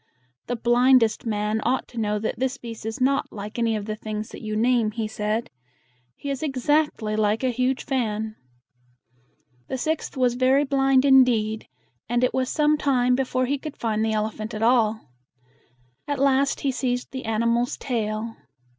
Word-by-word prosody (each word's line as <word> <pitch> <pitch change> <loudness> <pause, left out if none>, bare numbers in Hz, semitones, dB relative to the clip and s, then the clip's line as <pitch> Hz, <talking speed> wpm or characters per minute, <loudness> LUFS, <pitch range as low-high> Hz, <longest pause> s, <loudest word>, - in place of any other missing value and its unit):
"The 245 - -1
blind 245 +2 +5
est 225 +1 -2
man 210 0 0
ought 260 +2 0
to 240 - -6
know 210 -1 0
that 220 +2 -3
this 260 +1 -1
beast 230 -3 -8
is 220 - -4
not 275 +2 +1
like 210 +2 -7
any 230 -1 +1
of 210 -1 -4
the 215 0 -3
things 215 0 -5
that - - -10
you 215 -1 -4
name," 235 0 +2
he 220 0 -3
said. 215 +1 -2 0.6
"He 280 - -5
is 275 - -4
ex 270 -5 -4
act 300 -5 +2
ly 215 0 -2
like 215 +2 +1
a 255 - +2
huge 255 +2 -1
fan." 220 -5 -2 1.3
The 260 - -3
sixth 310 +2 -2
was 250 -2 +3
very 260 +3 +3
blind 270 -1 +3
indeed, 240 -5 +4 0.4
and 240 +1 +1
it 250 - +2
was 260 0 0
some 300 0 +2
time 250 -4 +2
before 255 0 0
he 280 +2 -1
could 305 0 -8
find 220 -2 -1
the 220 0 0
elephant 215 +1 -3
at 215 - -3
all. 225 - +2 1.0
At 285 -1 -1
last 275 0 +2
he 275 - +1
seized 250 -1 -2
the 260 -1 -6
animal's 235 +2 0
tail. 225 -2 -3
240 Hz, 180 wpm, -24 LUFS, 220-265 Hz, 1.3 s, blind